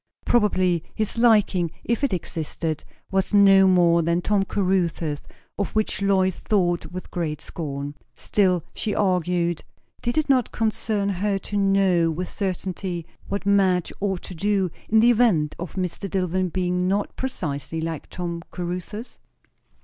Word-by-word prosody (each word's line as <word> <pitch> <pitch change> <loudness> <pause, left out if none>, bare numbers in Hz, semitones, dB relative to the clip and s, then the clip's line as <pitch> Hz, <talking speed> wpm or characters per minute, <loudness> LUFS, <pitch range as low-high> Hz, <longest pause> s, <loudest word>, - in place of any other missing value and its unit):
Probably 185 -7 +2
his 215 -1 -1
liking, 210 -7 +4
if 235 +3 -1
it 280 - +2
existed, 160 -3 -3 0.3
was 190 +2 +1
no 195 -1 +7
more 175 -2 +4
than 170 +1 +1
Tom 205 -1 +2
Caruthers', 175 -6 0 0.4
of 200 - 0
which 215 -3 0
Lois 190 -2 +2
thought 175 -5 0
with 185 +1 -8
great 155 -4 -2
scorn. 145 -4 -5 0.2
Still, 185 -5 +1
she 210 - -2
argued, 175 -4 +1 0.4
did 240 +3 -2
it 310 - +2
not 260 -4 +2
concern 215 -2 -1
her 200 +1 0
to 205 - -7
know 195 -4 +3
with 175 +3 -3
certain'ty 185 -2 -3 0.2
what 200 +1 -3
Madge 190 -3 +2
ought 195 -3 -1
to - - -6
do, 195 0 0 0.2
in 220 0 +5
the 240 +2 +6
event 210 -11 +3
of 175 0 -6
Mr. 185 +1 -3
Dillwyn 185 0 0
being 180 0 0
not 200 +2 -1
precisely 165 - -4
like 160 -1 -4
Tom 170 -1 -4
Caruthers? 180 +6 -6
185 Hz, 145 wpm, -24 LUFS, 170-200 Hz, 0.4 s, no